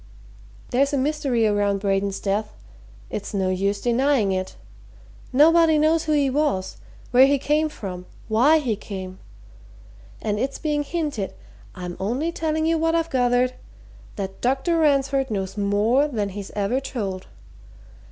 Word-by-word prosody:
There's 275 +3 +2
a - - +2
mystery 270 -4 0
around 205 -1 +1
Braden's 195 0 0
death 210 +2 -2 0.6
it's 210 - -5
no 190 -1 +1
use 200 +2 0
denying 245 -3 +2
it. 185 0 -3 0.8
Nobody 320 +3 +5
knows 315 +2 +2
who 310 - +1
he 290 -2 +3
was, 265 -9 -1 0.3
where 255 +2 +7
he 285 0 +3
came 300 +3 +1
from, 180 -9 -7 0.2
why 250 +9 +4
he 250 -8 -1
came. 190 -2 -8 1.0
And 210 -1 -2
it's 270 +3 -2
being 300 -1 -1
hinted 290 - -3 0.4
I'm 180 -2 -6
only 250 - -1
telling 315 -2 -1
you 325 0 +2
what 325 +1 +1
I've 330 0 0
gathered 250 0 +2 0.6
that 195 -1 -6
Dr. 270 +7 +1
Ransford 275 -3 +2
knows 195 -3 -3
more 210 +7 +2
than 215 -8 -2
he's 200 0 -7
ever 210 +5 0
told. 200 -9 -5
250 Hz, 140 wpm, -23 LUFS, 200-295 Hz, 1.0 s, where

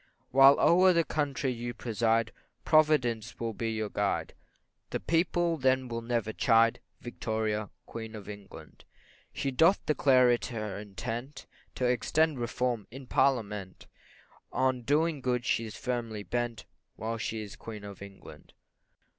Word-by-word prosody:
While 135 +1 +7
o'er 185 +2 +6
the 170 -1 +3
country 140 -4 -1
you 120 0 -5
preside, 115 0 0 0.3
Providence 150 -8 +2
will 115 -1 -2
be 115 +1 -3
your 110 -1 -2
guide, 100 -1 -1 0.6
The - - -2
people 170 0 +1
then 130 -2 +1
will 115 0 -3
never 115 -2 -2
chide, 115 +1 +3 0.2
Victoria, 110 -3 -2 0.2
Queen 110 -1 -7
of 105 -2 -9
England. 100 -6 -11 0.5
She 135 - -2
doth 165 +9 +3
declare 130 -4 +4
it 120 - 0
her 110 -5 -5
intent 115 +7 -6 0.3
To 125 - -1
extend 140 +4 +1
reform 120 -2 -2
in 135 +3 -10
parliament, 105 -8 0 0.7
On 130 -1 +1
doing 150 +4 +1
good 125 -1 -1
she's 110 -2 -1
firmly 115 -4 -3
bent, 120 +1 -3 0.3
While 115 +1 -4
she 110 -1 -3
is 100 - -9
Queen 110 -2 -9
of 100 -1 -9
England. 100 -1 -12
120 Hz, 140 wpm, -29 LUFS, 110-135 Hz, 0.7 s, While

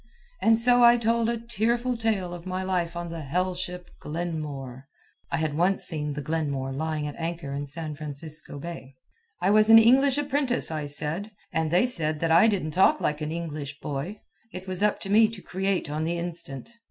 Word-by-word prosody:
And 225 0 +5
so 245 +1 +5
I 240 0 +8
told 230 0 +1
a 235 - 0
tearful 235 +2 -1
tale 215 -6 -1
of 175 +1 -9
my 185 0 -2
life 180 -2 -1
on 170 -1 -5
the 165 -1 -5
hell 180 +6 -1
ship 180 0 -5
Glenmore. 150 -5 -5 0.4
(I - - +1
had 155 -1 -1
once 180 +4 +2
seen 150 -3 -2
the 145 0 -5
Glenmore 140 -3 -2
lying 155 +2 -2
at 145 - -5
anchor 165 -4 -4
in 145 +1 -4
San 155 +1 -4
Francisco 150 0 -7
Bay.) 140 -3 -8 0.5
I 195 - +4
was 215 +1 +5
an 225 - +10
English 260 +4 +5
apprentice, 285 - 0
I 155 -2 -3
said. 150 +8 -2 0.2
And 160 -1 0
they 180 +8 +4
said 155 -10 +1
that 165 -1 +1
I 170 +7 +7
didn't 195 -8 0
talk 190 - +4
like 150 +1 -1
an 155 0 -3
English 150 -4 -5
boy. 150 +9 -5 0.3
It 185 +1 -8
was 185 0 -2
up 210 0 +2
to 195 - -7
me 220 +1 +6
to 225 -2 -8
create 190 -1 -1
on 150 +2 -2
the 170 +2 -1
instant. 170 - -4
170 Hz, 200 wpm, -26 LUFS, 150-210 Hz, 0.5 s, an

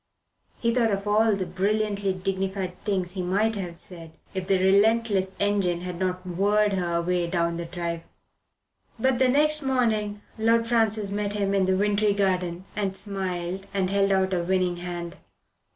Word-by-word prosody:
He 230 0 0
thought 235 -2 +3
of 200 0 -2
all 215 +1 +4
the 190 -1 -2
brilliantly 200 +2 0
dignified 190 0 -2
things 185 -4 -1
he 185 0 -4
might 200 +5 +1
have 180 -5 -5
said, 165 -2 -6 0.2
if 190 -1 -4
the 195 -1 +3
relentless 200 +1 +3
engine 200 -4 +1
had 180 -1 -5
not 185 0 -2
whirred 205 +3 +2
her 175 -3 -1
away 175 +1 0
down 170 -1 0
the 170 - -4
drive. 170 -1 -4 1.0
But 260 +2 +1
the 260 -1 +4
next 305 +3 +3
morning 220 -6 0 0.2
Lord 230 +1 +3
Francis 220 -3 +1
met 205 0 -2
him 200 -1 0
in 195 -1 +3
the 190 0 +2
wintry 205 0 +2
garden 185 -2 0
and 195 -2 -1
smiled 190 -2 -3
and 190 -1 +1
held 200 0 +2
out 190 0 +2
a 180 - +1
winning 180 0 0
hand. 175 0 -6
195 Hz, 170 wpm, -26 LUFS, 180-210 Hz, 1.0 s, all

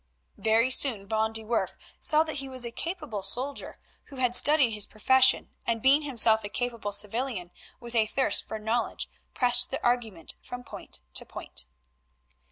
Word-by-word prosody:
Very 225 +3 +2
soon 235 -7 +2
Van 220 +1 0
de 220 0 -2
Werff 230 +1 -2 0.2
saw 310 +1 +4
that 315 -2 -5
he 270 -1 -6
was 255 -2 -3
a 235 - -4
capable 300 - -5
soldier 255 +8 -1 0.3
who 280 - -13
had 250 -2 0
studied 285 -3 +6
his 210 -1 0
profession, 260 +4 +3 0.2
and 230 -1 0
being 275 +3 +5
himself 230 -6 +3
a 205 - -5
capable 235 -3 -4
civilian 210 -2 0 0.3
with 240 0 -8
a 220 -2 +2
thirst 265 +4 +2
for 220 - -5
knowledge 220 +3 -2 0.3
pressed 245 -1 +4
the 270 - -5
argument 225 -9 -1
from 245 0 -9
point 60 - -9
to - - +1
point. 70 -2 -7
235 Hz, 170 wpm, -27 LUFS, 220-265 Hz, 0.3 s, studied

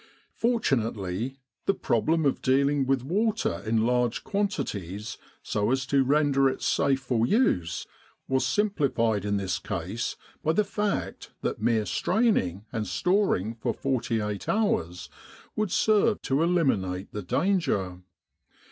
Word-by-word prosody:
Fortunately 120 - -1 0.3
the 195 - +3
problem 155 +6 +1
of 140 - +1
dealing 140 +1 +2
with 135 -2 +1
water 190 - 0
in 110 0 +2
large 125 -1 +1
quantities 110 - -3 0.2
so 105 +1 0
as 130 0 +1
to 135 +1 +3
render 140 -1 +3
it - - -5
safe 135 -1 +2
for 120 -3 0
use 90 - +1 0.4
was 130 0 +1
simplified 135 - +1
in 100 0 +1
this 95 -3 -2
case 95 +4 -3 0.3
by 160 - +1
the 210 - +3
fact 205 0 -3
that - - -2
mere 110 -1 +2
straining, 105 - +1
and 110 -3 -3
storing 180 - +1
for 115 - -3
48 115 -6 -2
hours, 90 - 0 0.5
would 215 -2 0
serve 215 0 +3
to 135 +3 +1
eliminate 110 - +1
the 105 - -4
danger. 100 - 0
130 Hz, 130 wpm, -27 LUFS, 105-165 Hz, 0.5 s, the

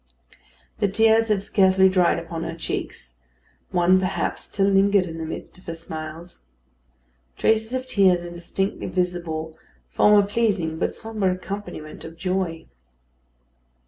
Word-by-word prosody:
The 205 - +2
tears 225 +2 +4
had 205 -3 +1
scarcely 190 -2 +4
dried 185 -3 +3
upon 165 -1 -5
her 165 - -4
cheeks; 60 - -5 0.5
one 180 0 +4
perhaps 185 0 -1
still 195 - 0
lingered 195 0 +4
in 165 -2 -7
the 160 - -4
midst 160 - -8
of - - -22
her 165 - -4
smiles. 160 +1 -8 1.0
Traces 220 +1 +2
of 255 0 -3
tears 190 -8 +3
indistinctly 175 +3 -3
visible 170 -3 -2 0.4
form 210 - +5
a 205 - +5
pleasing 200 -7 0
but - - -1
sombre 215 -4 -1
accompaniment 185 -5 -7
of 165 - -10
joy. 180 -2 -2
185 Hz, 135 wpm, -23 LUFS, 165-200 Hz, 1.0 s, form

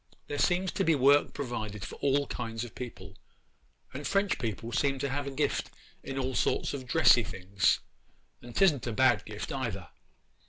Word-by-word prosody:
There 145 - -4
seems 180 +1 +2
to 195 - -1
be 165 -3 +3
work 140 +2 +4
provided 110 -7 -4
for - - -8
all 140 0 +2
kinds 115 -3 -4
of 120 - -8
people, 125 -2 -9 0.7
and 140 +3 -4
French 200 -3 +1
people 115 -1 -4
seem 135 +2 +1
to 140 +1 -2
have 140 +1 -2
a - - -1
gift 135 - -1 0.3
in 135 - -6
all 130 0 -1
sorts - - 0
of 130 -3 -6
dressy 125 -3 +6
things, 95 +1 0 0.6
and 120 -1 -11
'tisn't 150 -11 +3
a 115 - -2
bad 130 +2 +3
gift 105 0 -6
either. 105 -9 -4
130 Hz, 175 wpm, -30 LUFS, 115-145 Hz, 0.7 s, dressy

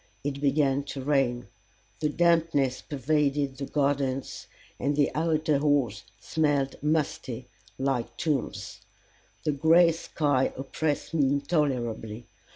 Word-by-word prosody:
It 140 0 -3
began 140 -1 +2
to 140 -1 -6
rain. 130 -4 +1 0.5
The 150 - +1
dampness 165 -6 +2
pervaded 145 -1 0
the 140 - -4
gardens, 140 -2 -1 0.3
and 145 +2 0
the 145 -1 +2
outer 155 -2 +1
halls 140 -7 +1
smelled 145 -4 0
musty, 140 -5 -1 0.3
like 125 -3 -1
tombs; 150 -5 -2 0.6
the 150 - +1
gray 165 +4 +5
sky 145 -4 0
oppressed 145 +4 -2
me 145 -4 +3
intolerably. 130 -6 -1
140 Hz, 110 wpm, -27 LUFS, 135-150 Hz, 0.6 s, gray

